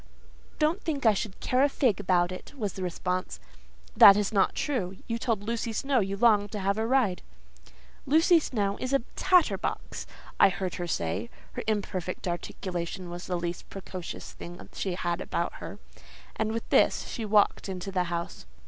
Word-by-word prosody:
"Don't 320 +6 +1
think 290 -6 -3
I 220 - +7
should 200 -1 -4
care 255 +1 +2
a 285 - +5
fig 250 -8 +1
about 180 -2 +2
it," 185 - -8
was 210 -6 -2
the 190 - -7
response. 180 +1 -2 0.6
"That 200 0 +10
is 210 +1 0
not 195 -2 +3
true. 195 -11 -2
You 230 0 -3
told 220 -4 -1
Lucy 230 +1 -2
Snowe 265 +4 +1
you 195 0 -1
longed 205 -2 +4
to 210 - -3
have 200 +2 0
a 225 - 0
ride." 240 -8 +2 0.9
"Lucy 325 +4 +5
Snowe 205 -9 -1
is 255 +1 -3
a 275 - +3
tatter 365 -3 +4
box," - - -4 0.3
I - - +8
heard 185 -1 -3
her 175 - -2
say 100 - -2 0.2
(her - - -5
imperfect 190 -5 -2
articulation 175 0 -4
was 175 +1 -7
the 180 - -1
least 170 0 -5
precocious 185 -2 -7
thing 175 +1 -10
she 190 -3 -2
had 175 -1 -2
about - - -2
her); - - -7 0.6
and 220 0 -1
with 230 0 -4
this; - - +3
she 230 - -5
walked 210 -1 +2
into 185 +1 -5
the 180 -2 +1
house. 170 - -5
200 Hz, 180 wpm, -28 LUFS, 180-230 Hz, 0.9 s, That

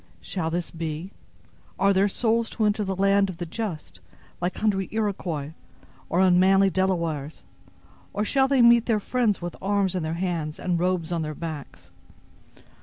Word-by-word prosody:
Shall 170 - -3
this 170 +1 -3
be? 165 +2 -5 0.7
Are 200 0 +3
their 195 +1 +3
souls 230 +2 0
to 220 - -1
enter 210 0 +1
the 190 -1 -2
land 195 +1 +3
of 180 - -7
the 175 - -4
just 180 -2 -5 0.4
like 180 +1 -2
hungry 195 -3 0
Iroquois 185 -9 -2 0.6
or 175 - +2
unmanly 190 +1 +5
Delawares, 170 -6 -1 0.7
or 210 +1 -1
shall 265 +3 +3
they 265 -3 +4
meet 235 0 +6
their 220 -3 +2
friends 220 -4 0
with 175 - -5
arms 200 -1 +1
in 185 - -1
their 160 +1 -2
hands 170 -4 -2
and 175 -2 -1
robes 180 -2 0
on 170 -1 0
their 155 -1 -4
backs? 155 -4 -8
185 Hz, 165 wpm, -25 LUFS, 170-205 Hz, 0.7 s, meet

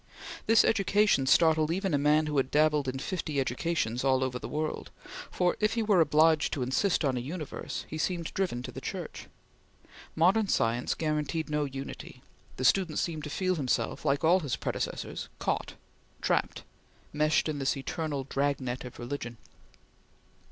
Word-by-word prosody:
This 225 -1 +6
education 205 -8 +3
startled 160 0 +4
even 190 +1 -1
a 145 - +3
man 150 +2 +3
who 150 -1 -2
had 135 -1 +1
dabbled 150 -2 +2
in 130 +1 -2
fifty 155 -1 -3
educations 130 -3 -1
all 130 -1 +3
over 125 -1 -2
the - - -7
world; 155 +1 -3 0.4
for, 180 -1 +1
if 215 +1 +1
he 230 - +1
were 205 -5 +4
obliged 155 0 +4
to 135 - -1
insist 155 +7 +1
on 130 -2 +1
a - - 0
Universe, 135 - -5
he 155 - -6
seemed 170 0 -2
driven 175 -11 -1
to - - -6
the - - -8
Church. - - -6 0.9
Modern 190 +6 +3
science 115 -6 +1
guaranteed 155 0 -2
no 150 -1 +1
unity. 135 0 -8 0.3
The 130 - -2
student 170 +2 +3
seemed 155 -3 -2
to - - -5
feel 185 +3 0
himself, 135 -4 -1
like 140 +2 +1
all 175 +4 +5
his 145 -7 -2
predecessors, - - -4
caught, - - -2 0.4
trapped, - - 0 0.5
meshed 150 +2 +2
in 150 -2 -2
this 135 +1 0
eternal 145 0 -3
drag 140 +1 0
net 130 -1 -4
of 125 - -9
religion. 120 -1 -5
150 Hz, 165 wpm, -29 LUFS, 135-170 Hz, 0.9 s, This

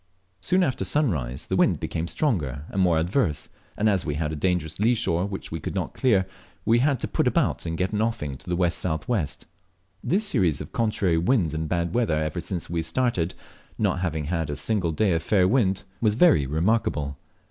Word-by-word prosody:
Soon 180 - +2
after 130 -7 -1
sunrise 75 - -1
the - - -1
wind - - +3
became 85 +1 -3
stronger 75 - -1
and 95 - -1
more 90 -3 +3
adverse, 85 - 0 0.3
and 105 - +2
as 95 -4 +2
we 75 -4 -2
had 75 0 -1
a - - -3
dangerous 85 -1 -1
lee 115 +4 +3
shore 95 -5 0
which 95 -1 -6
we 80 - -3
could - - -5
not - - -2
clear, 105 -8 +2 0.4
we 115 +1 +4
had 135 0 +2
to - - -1
put - - 0
about - - +1
and 80 0 -3
get 95 +4 -1
an 105 - +1
offing 90 -12 -2
to 80 - -12
the 90 - -1
W.S.W. 85 +2 0 0.8
This 205 +5 +1
series 85 - +2
of - - -8
contrary 100 -7 +1
winds 90 - +2
and 80 0 -3
bad 85 0 -1
weather 115 -10 +1
ever 80 +2 -2
since 85 -1 -4
we 85 0 -1
started, 90 0 0 0.4
not - - +1
having 80 -4 -2
had 80 -1 -2
a 75 - -2
single 90 +3 -1
day 95 +5 +1
of 80 - 0
fair 90 +1 +3
wind, 95 -4 +2 0.2
was 105 -2 +3
very 125 - +5
remarkable. 75 - 0
90 Hz, 200 wpm, -25 LUFS, 80-110 Hz, 0.8 s, very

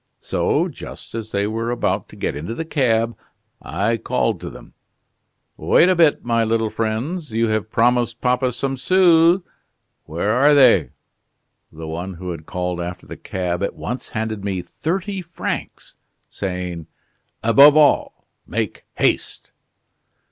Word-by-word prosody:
So, - - 0
just - - -10
as 110 -1 -5
they 100 0 0
were 115 +2 -2
about 120 - -1
to - - -13
get - - -3
into 80 +11 -5
the 165 - -4
cab, 115 -7 +1 0.5
I 115 +3 -1
called - - -1
to - - -5
them: - - -13 0.8
'Wait 180 - +4
a 185 - +4
bit, 165 -7 +3
my 115 -1 +2
little 110 -1 0
friends, 125 +9 -3
you 115 +1 +1
have 110 0 -1
promised 120 0 +1
papa 125 0 +1
some 135 +2 -3
sous; 175 +2 +4 0.6
where 85 +7 -1
are 140 +6 +5
they?' 115 - +5 0.8
The 80 +1 -9
one 90 +4 -5
who 90 +1 -6
had 80 -2 -8
called 90 -1 -3
after 90 +1 -6
the - - -8
cab 90 -2 -3
at 100 - -2
once 125 0 -5
handed 110 -2 -4
me 95 -3 -2
thirty 190 - -3
francs, 175 0 -5 0.3
saying: 90 -4 -5 0.6
'Above 140 +6 +7
all, 150 -2 +3 0.2
make - - -3
haste! - - -1
115 Hz, 145 wpm, -21 LUFS, 95-140 Hz, 0.8 s, Above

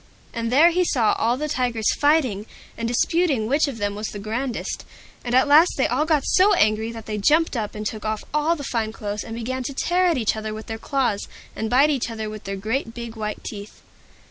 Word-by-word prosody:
And 230 0 -2
there 315 +7 +6
he 360 +2 +2
saw 245 -10 +2
all 235 +2 +1
the 305 +2 -2
Tigers 245 -5 0
fighting, 265 -9 +1 0.3
and 230 - -3
disputing 275 0 +1
which 285 +7 +2
of 270 -5 -5
them 205 -1 -1
was 210 +1 -4
the - - -7
grandest. 230 +5 -3 0.4
And 245 0 -1
at 260 +3 +5
last 310 +5 +6
they - - +2
all 305 - +1
got 310 -4 +1
so 395 +2 +4
angry 215 -3 +2
that 225 -1 -9
they 210 -1 -3
jumped 310 +8 +3
up 220 -3 -3
and 210 0 -5
took 215 0 -4
off 215 -1 -2
all 300 +3 +2
the 290 - -7
fine 225 -4 -2
clothes, 205 -1 -4
and 225 - -7
began 255 +3 -3
to 265 +2 -5
tear 355 +1 +2
each 225 -3 +1
other 215 0 -4
with 220 - -8
their 225 0 -6
claws, 250 -6 -1 0.3
and 220 - -3
bite 275 +5 +4
each 260 -5 -1
other 220 -2 -5
with 215 -1 -9
their 195 0 -3
great 225 +3 -3
big 235 -1 -7
white 215 -1 -5
teeth. 205 -1 -9
230 Hz, 225 wpm, -23 LUFS, 215-285 Hz, 0.4 s, there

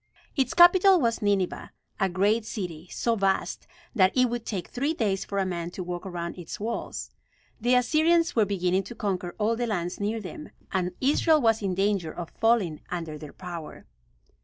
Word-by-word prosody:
Its 265 -5 0
capital 365 +2 +7
was 230 -5 0
Nineveh, 200 -3 0 0.3
a 195 -2 +2
great 205 +5 +2
city, 180 -6 -6
so 235 -1 0
vast 195 -2 -1 0.3
that 190 -5 +4
it 255 -2 +4
would 240 -1 -4
take 190 -5 -3
three 285 +6 -1
days 200 -8 0
for 200 - -5
a 195 - +2
man 170 -2 -3
to 180 +1 -6
walk 175 +1 -5
around 175 -1 -5
its 170 - -7
walls. 230 +3 -4 0.5
The 245 +2 +3
Assyrians 320 +6 +3
were 225 - +5
beginning 185 -1 +1
to 235 - -8
conquer 185 -5 -3
all 220 +2 +1
the 240 +1 -2
lands 180 -5 -2
near 210 +2 -1
them, 185 -6 -8 0.2
and 180 -1 -1
Israel 305 +3 +4
was 225 -4 +2
in 190 -3 -1
danger 195 -4 0
of 170 0 -7
falling 220 -9 +1
under 165 -4 -4
their 150 -2 -9
power. 175 -4 -8
200 Hz, 185 wpm, -27 LUFS, 180-235 Hz, 0.5 s, capital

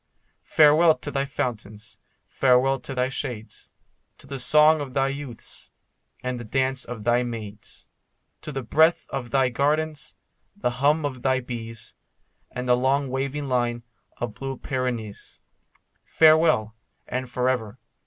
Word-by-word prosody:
Farewell 155 +1 +6
to 145 - -6
thy 135 0 0
fountains, 110 -5 -5 0.3
farewell 135 +1 +3
to 135 +2 -6
thy 125 0 +1
shades, 120 -4 -6 0.5
To - - -14
the 135 -1 -6
song 150 +4 +5
of 135 -2 -7
thy 135 0 +2
youths, 135 -4 -8 0.5
and 125 -1 -3
the - - -6
dance 130 +3 -1
of 120 -3 -7
thy 120 +2 +3
maids, 110 -4 -7 0.5
To 150 - -6
the 135 -2 -4
breath 160 +8 +3
of 130 -3 -4
thy 135 0 +2
gardens, 150 +4 -1 0.4
the 160 -12 -1
hum 145 +5 +2
of 130 -3 -4
thy 130 +1 +2
bees, 115 -3 -7 0.6
And 125 0 -5
the 125 - +5
long 135 +2 +1
waving 140 +2 -2
line 120 -2 0 0.3
of 120 -3 -4
the - - -24
blue 135 -1 -4
Pyrenees. 120 -6 -4 0.6
Farewell, 155 -9 +4 0.3
and 130 0 -3
for 125 +1 -1
ever. 115 -5 -1
130 Hz, 145 wpm, -25 LUFS, 120-140 Hz, 0.6 s, Farewell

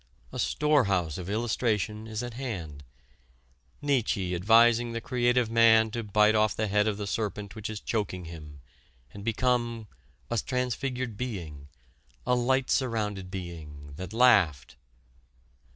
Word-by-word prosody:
A - - -6
storehouse 100 - +1
of 90 +1 -6
illustration 110 -1 -1
is 110 +1 -4
at 120 -1 -6
hand: 90 - -6 1.0
Nietzsche 115 -10 0
advising 115 +5 +4
the 115 - -2
creative 120 -1 +1
man 110 -1 +5
to 115 +1 -3
bite 105 +1 +3
off 110 -1 +2
the 110 - -1
head 105 +1 +2
of 105 -2 -1
the 105 - -4
serpent 105 0 -3
which 110 -1 -6
is 110 -1 -5
choking 95 -6 -3
him 75 -4 -10 0.5
and 100 - -9
become 120 0 0 0.5
"a 120 - +1
transfigured 125 -1 -2
being, 85 - -6 0.6
a 125 - +2
light 130 +2 +1
surrounded 105 -7 -1
being, 80 -6 -8
that 95 0 -6
laughed!" 105 - +3
110 Hz, 135 wpm, -28 LUFS, 95-120 Hz, 1.0 s, man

